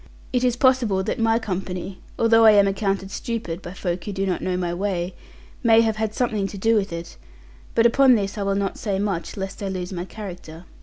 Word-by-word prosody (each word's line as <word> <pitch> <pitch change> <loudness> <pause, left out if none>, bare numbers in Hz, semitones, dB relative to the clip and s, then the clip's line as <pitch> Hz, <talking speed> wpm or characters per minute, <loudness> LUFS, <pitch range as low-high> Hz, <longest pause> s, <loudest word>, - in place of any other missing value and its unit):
It 250 0 +1
is 250 -2 +2
possible 245 -7 +3
that 215 - -2
my 225 0 +3
company 185 -3 -4 0.2
although 230 0 +5
I 220 -1 +8
am 200 -1 +5
accounted 195 -1 -1
stupid 200 -6 -4
by 175 - -8
folk 180 -2 -3
who 205 - -3
do 195 0 -2
not 185 -2 -1
know 185 -1 -1
my 175 -1 -2
way 180 -1 -2 0.5
may 230 -2 +6
have 220 -1 0
had 215 0 -2
something 215 -5 0
to 200 - -8
do 225 +4 +2
with 200 -3 0
it; 170 0 -7 0.6
but 230 - +4
upon 255 +2 +6
this 200 -1 -2
I 210 - -4
will 195 0 0
not 195 -1 -2
say 200 -3 -1
much, 195 -3 -3
lest 195 +1 -5
I 200 - -2
lose 185 -1 -4
my 175 0 -4
character. 180 -4 -9
200 Hz, 220 wpm, -23 LUFS, 185-225 Hz, 0.6 s, I